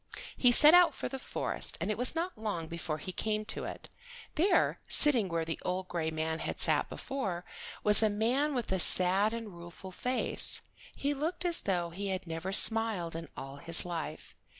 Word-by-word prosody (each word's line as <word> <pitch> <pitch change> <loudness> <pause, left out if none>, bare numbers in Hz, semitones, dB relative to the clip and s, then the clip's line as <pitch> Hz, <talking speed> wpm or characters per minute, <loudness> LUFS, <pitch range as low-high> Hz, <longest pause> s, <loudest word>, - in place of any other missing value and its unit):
He 245 - +3
set 300 +6 +7
out 350 -4 +5
for - - -5
the 270 - -7
forest, - - -3
and - - -3
it 215 - -4
was 250 +5 -2
not 340 +2 -3
long 205 -7 -5
before 160 -1 -6
he 170 +5 -8
came 215 +3 -3
to 220 - -5
it. - - -5 0.4
There, 360 +6 +1
sitting 245 -10 +4
where 165 -1 -3
the 160 -1 -5
old 185 +1 -4
gray 165 -2 -3
man 160 0 -4
had - - -5
sat - - +2
before, 190 -11 -5 0.4
was 210 +1 +5
a 220 - +2
man 250 +8 -1
with 240 -5 -4
a 190 - -1
sad 190 +4 +2
and 225 -3 -7
rueful 170 +2 -11
face. 250 +7 -1 0.4
He 285 +1 -2
looked 325 +5 -4
as 345 -1 +5
though 175 -3 -2
he 200 +4 -6
had 190 -1 -4
never 165 +3 -6
smiled 215 -6 +5
in 165 -2 -8
all 135 +1 -9
his 165 +5 +6
life. 165 -3 -7
195 Hz, 195 wpm, -30 LUFS, 170-250 Hz, 0.4 s, set